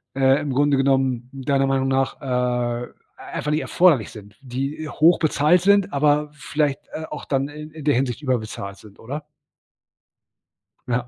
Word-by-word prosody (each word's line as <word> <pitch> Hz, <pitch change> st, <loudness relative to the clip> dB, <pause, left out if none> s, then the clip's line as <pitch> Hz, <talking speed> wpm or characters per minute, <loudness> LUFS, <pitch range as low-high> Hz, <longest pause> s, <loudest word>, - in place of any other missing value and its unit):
äh, 135 Hz, +1 st, +3 dB
im 145 Hz, -2 st, -3 dB
Grunde 145 Hz, +1 st, +3 dB
genommen, 135 Hz, -2 st, +1 dB
deiner 135 Hz, 0 st, 0 dB
Meinung 135 Hz, 0 st, +1 dB
nach, 135 Hz, 0 st, 0 dB
äh, 125 Hz, -2 st, -1 dB, 0.3 s
einfach 150 Hz, -, -4 dB
nicht 155 Hz, +1 st, +1 dB
erforderlich 160 Hz, -, +3 dB
sind, 105 Hz, -2 st, -12 dB
die 135 Hz, +4 st, -4 dB
hochbezahlt 160 Hz, +1 st, +3 dB
sind, 200 Hz, -3 st, +3 dB
aber 150 Hz, +1 st, +2 dB
vielleicht, 150 Hz, -1 st, -1 dB
äh, 160 Hz, -, -5 dB
auch 150 Hz, -, -7 dB
dann 135 Hz, -1 st, 0 dB
i -, -, -12 dB, 0.2 s
in 155 Hz, -, -9 dB
der 145 Hz, -, +3 dB
Hinsicht 125 Hz, 0 st, -1 dB
überbezahlt 110 Hz, -7 st, -3 dB
sind, 105 Hz, -2 st, -17 dB
oder? 145 Hz, +6 st, -6 dB, 1.6 s
Ja. 125 Hz, 0 st, -1 dB
135 Hz, 150 wpm, -22 LUFS, 125-150 Hz, 1.6 s, äh